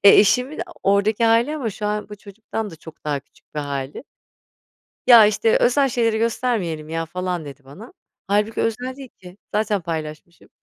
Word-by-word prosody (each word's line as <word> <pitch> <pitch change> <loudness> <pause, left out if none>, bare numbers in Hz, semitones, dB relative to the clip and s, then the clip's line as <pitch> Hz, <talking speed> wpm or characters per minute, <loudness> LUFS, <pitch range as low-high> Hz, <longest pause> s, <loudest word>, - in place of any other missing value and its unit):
Eee, 200 - +9
eşimin 250 +8 +3
o 350 - -13 0.2
oradaki 210 +3 +2
hâli 230 +7 +3
ama 235 -7 -2
şu 210 +1 -5
an 210 0 -2
bu 210 - -9
çocuktan 210 +1 -6
da 165 - -11
çok 160 0 -14
daha 145 -2 -1
küçük 145 - -30
bir 150 - -1
hâli. 140 - -5 1.0
Ya, 235 -3 +10
işte, 215 +2 +3
"Özel 270 +2 +3
şeyleri 230 -2 +1
göstermeyelim, 215 -9 -1
ya." 165 0 -2
falan 180 -1 -3
dedi 140 0 -11
bana. 190 - -12 0.3
Hâlbuki 210 +2 +1
özel 250 +3 -2
değil 270 -3 -10
ki, 180 +1 -13 0.2
zaten 210 -2 +1
paylaşmışım. 160 0 -7
210 Hz, 175 wpm, -22 LUFS, 165-230 Hz, 1.0 s, Ya